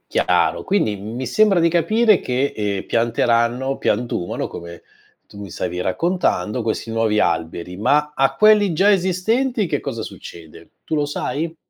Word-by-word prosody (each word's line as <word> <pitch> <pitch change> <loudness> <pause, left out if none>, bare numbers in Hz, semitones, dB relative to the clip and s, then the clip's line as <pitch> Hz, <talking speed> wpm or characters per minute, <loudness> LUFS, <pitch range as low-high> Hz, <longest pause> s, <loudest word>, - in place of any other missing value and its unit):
Chiaro, 90 -1 +1
quindi 190 - 0
mi 115 +6 -6
sembra 195 - +3
di 170 - +4
capire 215 +5 +3
che, 130 +3 -1
ehm, 100 -2 -2
pianteranno 120 +3 +1
piantumano, 105 -5 -2
come 85 0 -10 0.4
tu 100 - -14
mi 100 - -8
stavi 90 +1 -4
raccontando, 120 - -1
questi 115 +1 -3
nuovi 115 -2 +1
alberi. 85 +2 -2
Ma 150 +7 +1
a 135 -1 +1
quelli 210 -3 +5
già 195 +6 +3
esistenti 210 +6 0
che 145 -4 -2
cosa 115 -1 -5
succede? 85 -4 -11
Tu - - -3
lo 150 -1 +1
sai? 160 +3 -4
125 Hz, 150 wpm, -20 LUFS, -, 0.4 s, quelli